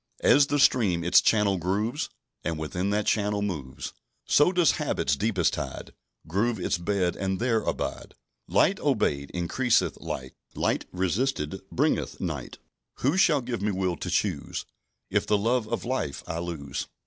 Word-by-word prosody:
"As 140 0 +6
the 145 - +1
stream 105 -11 +3
its 90 +2 +6
channel 105 -4 +3
grooves, 105 - -1 0.3
And 80 -1 -2
within 85 +5 -2
that 105 0 0
channel 105 -1 +1
moves; 75 -10 -5 0.3
So 150 +5 +4
does 175 -5 +4
habit's 70 +1 0
deepest 95 0 +1
tide 65 - -5 0.3
Groove 105 +6 0
its 90 - 0
bed 90 0 0
and 95 0 -1
there 115 -1 +1
abide. - - -4 0.3
"Light - - +3
obeyed 70 0 0
increaseth 115 +8 +1
light; 65 0 -5 0.2
Light - - 0
resisted 95 - -1
bringeth - - 0
night; - - -4 0.4
Who 140 +6 +2
shall 165 -7 +4
give 120 -2 -4
me 105 - +1
will 95 -3 0
to - - -5
choose - - -1 0.5
If - - +1
the 105 - +3
love 115 +2 +1
of - - -3
light 120 - -2
I 80 - -4
lose? 80 -5 -4
100 Hz, 155 wpm, -27 LUFS, 85-120 Hz, 0.5 s, As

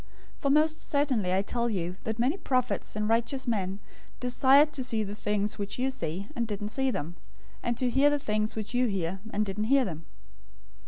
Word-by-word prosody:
013:017 - - -27
For 280 - +1
most 310 +2 +3
certainly 265 -10 +1
I 190 +1 +2
tell 235 +3 -1
you 180 -4 -2
that 220 0 -2
many 250 +7 +2
prophets 255 - -1
and 210 0 -1
righteous 235 +4 +1
men 195 -5 -1 0.4
desired 270 +4 +5
to 265 - -1
see 225 -3 +2
the 205 0 -5
things 210 0 -1
which 200 0 -4
you 260 +2 0
see, 185 -5 -4
and 235 -1 -1
didn't 205 -1 -4
see 265 +4 +1
them; 170 - -4 0.4
and 235 -1 -1
to 255 - +1
hear 270 +4 +4
the 290 - +2
things 215 -4 -1
which 215 +1 -4
you 250 0 +3
hear, 190 -2 -2
and 210 +1 0
didn't 205 +2 -2
hear 270 +2 +4
them. 165 -4 -6
225 Hz, 205 wpm, -28 LUFS, 200-260 Hz, 0.4 s, desired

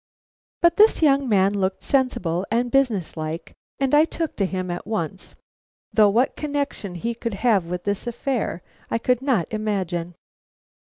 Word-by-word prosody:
But 340 0 +5
this 430 -5 +5
young 275 -3 +3
man 195 -1 +3
looked 190 -1 -1
sensible 190 -11 0
and 240 +2 0
business 245 - +1
like, 155 +1 -5 0.3
and 270 0 0
I 300 +2 +7
took 325 -1 -4
to 195 - +1
him 185 -1 -3
at 175 - -6
once, 190 -4 -4 0.6
though 215 -2 +6
what 235 +6 +2
connection 285 -10 -3
he 230 +7 -2
could 230 -2 -4
have 205 -7 +4
with 180 0 -4
this 205 +3 -2
affair 240 -6 -2 0.3
I - - +1
could 250 +2 +1
not 255 - +1
imagine. 190 -5 -2
215 Hz, 160 wpm, -23 LUFS, 185-265 Hz, 0.6 s, I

